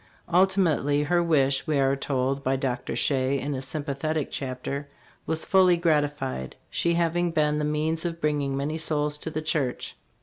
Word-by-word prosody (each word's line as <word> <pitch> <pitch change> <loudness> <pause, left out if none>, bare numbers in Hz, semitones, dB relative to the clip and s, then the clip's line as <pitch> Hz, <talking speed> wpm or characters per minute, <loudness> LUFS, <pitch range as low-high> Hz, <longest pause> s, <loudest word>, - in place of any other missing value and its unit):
Ultimate 185 -3 +3
ly 145 +1 +2
her 175 +3 +2
wish 140 -4 +2
we 155 -2 +1
are 135 0 +3
told 135 0 -1
by 130 +1 +1
Dr. 130 -2 -2
Shea, 135 0 +1
in 140 +2 -3
a 130 - -3
sympathetic 145 +2 -3
chapter, 135 +2 -4 0.4
was 160 0 0
fully 185 -2 +5
gratified, 145 - 0 0.2
she 170 0 +1
having 170 +1 +1
been 150 -2 +1
the 150 - 0
means 155 +2 0
of 170 -1 -3
bringing 145 -3 0
many 150 +3 -2
souls 150 -1 -1
to 160 - -4
the 155 0 -4
church. 145 -5 -2
150 Hz, 170 wpm, -26 LUFS, 135-160 Hz, 0.4 s, fully